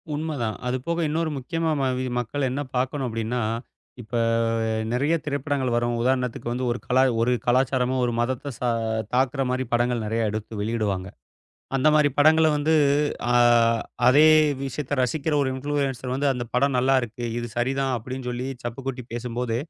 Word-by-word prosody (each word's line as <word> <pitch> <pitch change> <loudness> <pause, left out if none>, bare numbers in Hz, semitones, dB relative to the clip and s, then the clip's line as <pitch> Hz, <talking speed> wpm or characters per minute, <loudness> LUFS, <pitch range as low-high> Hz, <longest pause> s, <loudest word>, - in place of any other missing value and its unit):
உண்ம 155 +2 -3
தான். 110 -2 -2
அது 125 +1 0
போக 170 0 0
இன்னொரு 160 +1 0
முக்கியமா 165 +4 -2
ம - - 0 0.2
வி 130 - -2
மக்கள் 130 +4 -2
என்ன 140 +3 -2
பாக்கணும் 130 +1 -1
அப்படின்னா, 115 +2 -2 0.6
இப்ப 115 +1 -7 0.8
நெறைய 140 +6 +1
திரைப்படங்கள் 140 -3 -1
வரும். 120 0 0
உதாரணத்துக்கு 125 -1 -1
வந்து 125 +1 -2
ஒரு 120 - -3
கல 125 - +1 0.2
ஒரு 120 +2 +2
கலாச்சாரமும் 130 0 +2
ஒரு 120 - 0
மதத்த 130 +4 -2
ச - - -25 0.5
தாக்குற 130 +2 +1
மாதிரி 130 +1 0
படங்கள் 120 -1 +1
நெறைய 110 0 0
எடுத்து 110 +1 -5
வெளியிடுவாங்க. 105 -4 -1 0.7
அந்த 135 +3 +3
மாதிரி 150 -1 +5
படங்கள 160 +2 +6
வந்து 150 +2 +1 0.6
அ - - +2 0.7
அதே 145 +5 +7 0.4
விஷயத்த 140 +1 -3
ரசிக்கிற 155 +5 -1
ஒரு 135 - 0
இன்ஃப்ளுயன்ஸர் 135 -2 -2
வந்து, 140 +2 0
"அந்த 125 -2 -4
படம் 135 +1 +2
நல்லா 130 +2 +3
இருக்கு. 120 +1 -6
இது 120 - -3
சரி 120 +2 +1
தான்." 135 -1 0
அப்படின்னு 130 +3 -7
சொல்லிச் 125 +1 -5
சப்பு 120 +2 -5
கொட்டி 130 -1 -3
பேசும்போது, 120 -1 -3
130 Hz, 165 wpm, -24 LUFS, 120-140 Hz, 0.8 s, அதே